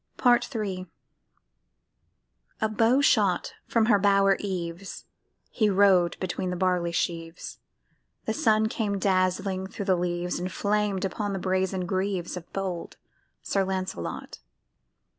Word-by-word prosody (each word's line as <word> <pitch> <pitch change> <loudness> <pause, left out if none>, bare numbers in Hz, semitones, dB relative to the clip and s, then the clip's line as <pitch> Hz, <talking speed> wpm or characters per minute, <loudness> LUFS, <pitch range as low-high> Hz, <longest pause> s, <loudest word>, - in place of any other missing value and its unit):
PART 245 +1 +3
III 190 -4 -3 1.7
A 220 - +2
bow 230 +5 +3
shot 200 -9 +2
from 230 -2 +2
her 210 -3 +4
bower 195 0 +4
eaves, 185 -1 -5 0.5
He 215 -3 +2
rode 190 -3 +4
between 185 0 -2
the 180 - -2
barley 180 -2 +1
sheaves, 165 -1 -3 0.7
The - - 0
sun 220 -7 +3
came 210 -3 -1
dazzling 190 0 0
thro' 195 +1 -6
the 190 - +3
leaves, 175 0 -2
And 180 +1 -3
flamed 205 -2 0
upon 200 +2 -2
the - - -2
brazen 185 0 0
greaves 185 -1 -2
Of 175 -2 -9
bold 185 -3 -4 0.5
Sir 195 - +1
Lancelot. 185 - -4
190 Hz, 125 wpm, -27 LUFS, 180-205 Hz, 1.7 s, her